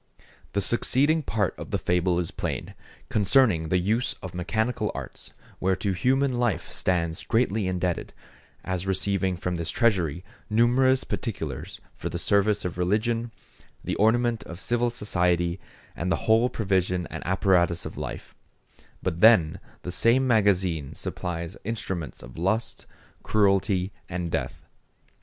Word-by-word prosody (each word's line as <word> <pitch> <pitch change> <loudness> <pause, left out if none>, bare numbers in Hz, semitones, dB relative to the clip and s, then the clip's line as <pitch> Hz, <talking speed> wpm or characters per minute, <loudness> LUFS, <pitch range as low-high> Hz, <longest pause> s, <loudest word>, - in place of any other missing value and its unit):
The 100 - +1
succeeding 140 - +3
part 105 - -1
of - - -7
the - - 0
fable 90 0 +1
is 85 -2 -1
plain, - - -4 0.4
concerning 105 - +3
the 90 - +3
use 110 +7 0
of 95 -2 -6
mechanic 110 +7 -1 0.2
arts, - - -7 0.3
whereto 95 +1 0
human 130 +6 +1
life 120 -5 0
stands 85 -3 -1
greatly 110 -4 +1
indebted, 90 -1 -2 0.5
as 95 0 -3
receiving 95 -1 0
from 90 0 -2
this 85 -1 -3
treasury 90 - +1 0.3
numerous 125 +4 +3
particulars 80 - -5 0.2
for - - -5
the - - -4
service 100 0 +2
of 90 0 -4
religion, 115 +5 0 0.5
the - - -2
ornament 115 +1 +2
of 85 +1 -8
civil 120 +3 +1
society, 90 -6 0 0.4
and 90 +2 -2
the - - -1
whole 115 +3 +4
provision 95 -5 0
and - - -5
apparatus 90 -2 +2
of - - -6
life; 65 -5 -6 0.7
but 85 -2 -2
then 105 -9 +6 0.2
the 90 - -4
same 115 +8 +4
magazine 95 - +2
supplies 85 0 -5
instruments 95 - -4
of 65 +5 -10
lust, 110 +7 -1 0.3
cruelty, 100 -2 +2 0.2
and 90 -2 -3
death. - - -3
95 Hz, 135 wpm, -26 LUFS, 90-115 Hz, 0.7 s, then